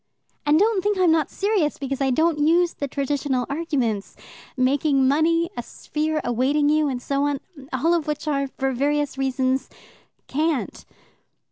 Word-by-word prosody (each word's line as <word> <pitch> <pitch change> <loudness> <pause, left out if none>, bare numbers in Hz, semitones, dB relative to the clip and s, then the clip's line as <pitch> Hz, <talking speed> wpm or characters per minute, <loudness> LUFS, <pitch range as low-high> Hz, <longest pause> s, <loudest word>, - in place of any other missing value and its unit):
"And 295 +1 +5
don't 415 +1 +3
think 415 -1 +1
I'm 365 -3 +4
not 320 -2 +2
serious 390 -7 0
because 275 0 -4
I 270 - +2
don't 315 +4 +2
use 335 +3 +3
the 285 - -4
traditional 275 -2 -1
arguments 265 -10 -2 0.4
making 270 +1 +2
money, 330 +5 +2
a - - -3
sphere 310 +1 -3
awaiting 270 +5 +1
you, 305 0 +3
and 260 -3 -2
so 275 +3 -1
on 290 -1 -1 0.3
all 295 +7 +1
of 330 -3 0
which 300 +1 -3
are, 275 -2 0
for 270 0 -2
various 290 +2 0
reasons, 265 0 0 0.6
cant." 305 0 -2
290 Hz, 155 wpm, -23 LUFS, 270-320 Hz, 0.6 s, And